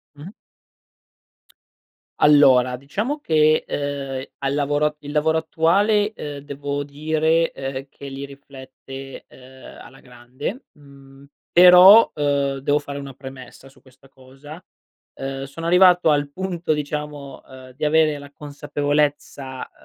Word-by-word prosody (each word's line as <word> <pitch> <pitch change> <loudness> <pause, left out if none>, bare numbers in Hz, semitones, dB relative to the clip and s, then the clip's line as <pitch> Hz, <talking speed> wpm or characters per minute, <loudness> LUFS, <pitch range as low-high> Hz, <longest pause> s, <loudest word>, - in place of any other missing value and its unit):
Mh. 150 +5 -10 1.9
Allora 130 -4 +5
diciamo 210 - -4
che, 155 - +2
ehm, 140 -2 -4
al 135 0 -2
lavoro 145 +1 0
il 145 0 -9
lavoro 160 +1 +1
attuale, 205 +7 +1
uhm, 145 -1 -7
devo 145 0 -5
dire, 160 +3 0
uhm, 135 0 -6
che 140 0 -12
li 135 +1 -7
riflette, 135 -1 -12
uhm, 130 0 -15
alla 135 - -15
grande. 125 - -8 0.2
Mhmm, 140 -1 -17 0.3
però, 180 +5 +8
uhm, 140 -2 -1
devo 145 +2 +1
fare 140 -1 -8
una 140 -1 -9
premessa 130 0 -12
su 135 - -21
questa 130 +1 -22
cosa. 135 +5 -14 0.6
Uhm, 135 0 -5
sono 140 +5 -8
arrivato 180 -1 +5
al 145 -1 +1
punto 175 -2 -4
diciamo, 150 -1 -6
uhm, 130 -1 -14
di 130 - -10
avere 155 0 +2
la 145 -1 -12
consapevolezza, 145 -2 -3
145 Hz, 125 wpm, -21 LUFS, 135-155 Hz, 1.9 s, però